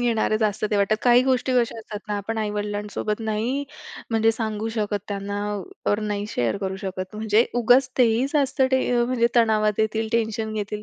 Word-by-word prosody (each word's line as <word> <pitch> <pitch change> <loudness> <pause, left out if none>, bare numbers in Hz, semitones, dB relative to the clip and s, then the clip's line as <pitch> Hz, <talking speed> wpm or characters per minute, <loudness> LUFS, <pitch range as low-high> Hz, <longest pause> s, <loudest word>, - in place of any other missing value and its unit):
घेणारे 225 -2 +1
जास्त 215 -1 0
ते 210 - +2
वाटतं, 200 +1 +2
काही 245 0 +6
गोष्टी 260 0 +1
कशा 235 -2 +1
असतात 215 -1 -7
ना, 210 - -1
आपण 220 +3 -4
आई-वडिलांसोबत 210 0 -3
नाही 225 +6 -1 0.5
म्हणजे 225 0 +3
सांगू 220 -1 -3
शकत, 210 -1 0
त्यांना 200 0 -3 0.5
वर 205 +1 +2
नाही 205 -1 -2
शेअर 120 - -1
करू 190 -1 -3
शकत, 185 -1 -6
म्हणजे 220 +1 +3
उगाच 245 +3 +4
ते 250 - +7
ही 245 +4 +1
जास्त 280 -2 +1
टे 260 0 +3 0.2
अ, 240 - +3
म्हणजे 240 -1 +2
तणावात 215 -3 +3
येतील, 220 0 0
टेन्शन 220 -1 -1
घेतील, 210 0 -4
220 Hz, 185 wpm, -23 LUFS, 210-235 Hz, 0.5 s, ते